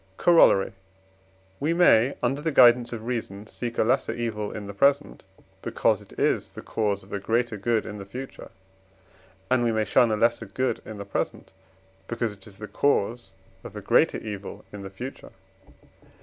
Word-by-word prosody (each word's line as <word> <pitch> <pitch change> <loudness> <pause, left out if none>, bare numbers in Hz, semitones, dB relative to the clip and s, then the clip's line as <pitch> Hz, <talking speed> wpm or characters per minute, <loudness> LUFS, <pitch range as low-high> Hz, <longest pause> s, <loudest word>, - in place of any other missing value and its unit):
Corollary. 165 - +5 0.9
We 155 +4 0
may, 135 -7 +5
under 135 +4 0
the 160 +1 -1
guidance 120 -3 +6
of 115 -2 -6
reason, 110 -4 -4
seek 120 +1 -6
a - - +4
lesser 130 +4 +1
evil 110 -3 -3
in 105 - -7
the 100 - -7
present, 140 +7 +1 0.4
because - - +1
it - - -16
is - - 0
the - - -9
cause 105 -3 -1
of 95 - -13
a 100 - -2
greater 115 +3 0
good 110 +2 0
in 105 -1 -7
the 100 - -8
future, 130 +6 -8 1.0
and 130 -1 +3
we 120 - +2
may 110 -1 0
shun 115 +3 +3
a 110 - +1
lesser 115 0 +1
good 130 +6 -2
in 110 - -8
the 100 - -7
present, 100 - -4 0.6
because 115 -2 -2
it 100 0 -15
is 100 -2 -14
the 105 - -7
cause 120 -5 0 0.3
of - - -10
a - - -6
greater - - +3
evil 100 -2 -7
in 105 - -7
the 95 - -7
future. 125 +8 -9
115 Hz, 180 wpm, -25 LUFS, 105-125 Hz, 1.0 s, guidance